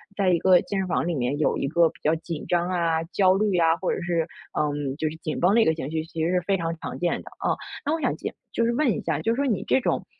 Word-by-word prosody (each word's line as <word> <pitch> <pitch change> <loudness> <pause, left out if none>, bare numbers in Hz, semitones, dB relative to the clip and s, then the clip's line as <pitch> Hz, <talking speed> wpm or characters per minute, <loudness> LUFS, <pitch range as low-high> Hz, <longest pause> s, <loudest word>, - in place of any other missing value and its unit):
在 195 -2 +2
一 175 - +4
个 185 0 +5
健 200 - -4
身 190 - -1
房 175 - 0
里 175 - 0
面 125 +1 0
有 - - +2
一 140 - -1
个 165 +2 +4
比 - - -19
较 155 - +3
紧 165 -1 -6
张 175 0 +1
啊、 165 -3 +1
焦 185 +2 +3
虑 200 -1 +1
啊， 165 -1 +4
或 185 - -1
者 - - -2
是， 170 -2 0 0.3
嗯， 145 -2 -1
就 155 -1 0
是 160 - -8
紧 155 -1 -4
绷 185 +4 +4
的 230 - +6
一 - - +4
个 160 - +3
情 150 -3 -5
绪， 160 0 -2
其 165 -1 -4
实 165 - +1
是 180 - +3
非 195 +3 +1
常 165 -2 -2
常 - - -6
见 175 0 0
的 - - -12
啊。 - - 0 0.3
那 300 +2 0
我 - - -4
想 - - 0
就 - - -5 0.2
就 230 - +1
是 235 - +2
问 270 -1 +2
一 - - -2
下， 160 -3 -1
就 225 - +1
说 280 +3 0
你 220 -8 0
这 265 - +3
种， - - -1
170 Hz, 325 characters per minute, -25 LUFS, 160-190 Hz, 0.3 s, 的